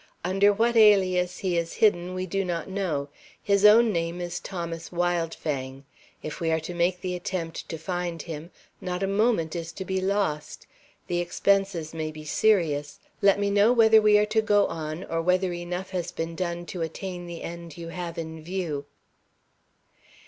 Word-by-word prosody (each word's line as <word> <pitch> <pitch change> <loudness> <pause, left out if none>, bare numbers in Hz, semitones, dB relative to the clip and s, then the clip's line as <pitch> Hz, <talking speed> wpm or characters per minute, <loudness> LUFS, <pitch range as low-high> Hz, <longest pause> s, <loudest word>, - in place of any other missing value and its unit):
Under 195 +3 +4
what 230 +3 +1
alias 185 -5 +4
he 185 -3 -1
is 165 0 -4
hidden 185 -4 +2
we 185 0 -2
do 195 +2 -1
not 175 -3 -3
know. 180 -8 -2 0.3
His 200 -1 +2
own 220 +1 +7
name 170 0 -2
is 175 0 -4
Thomas 170 -3 -5
Wildfang. 160 -6 -2 0.4
If 155 - -6
we 165 - 0
are 160 0 +2
to 175 - -6
make 175 +1 0
the 180 -1 -3
attempt 175 -2 -4
to 165 - -4
find 175 0 -3
him, 165 -1 -7 0.3
not 180 +1 -3
a - - +1
moment 200 -5 +1
is 165 -1 -4
to 190 - -6
be 190 0 -1
lost. 185 -6 -1 0.4
The 175 -1 -1
expenses 180 -2 +1
may 160 -1 -3
be 155 0 -10
serious. 155 -6 +1 0.2
Let 200 0 +5
me 200 0 +1
know 205 +4 +5
whether 220 -2 +6
we 210 -1 +6
are 210 - +4
to 215 +1 +1
go 205 -2 +3
on, 155 +2 -4
or 165 -3 -2
whether 180 +1 +1
enough 175 +2 -5
has 180 -3 -3
been 165 0 -4
done 175 -1 -3
to 175 0 -6
attain 175 +2 -5
the 170 -1 -7
end 170 0 -8
you 165 -1 -7
have 175 -1 -6
in 160 -1 -6
view." 165 -4 -3
175 Hz, 180 wpm, -26 LUFS, 165-195 Hz, 0.4 s, own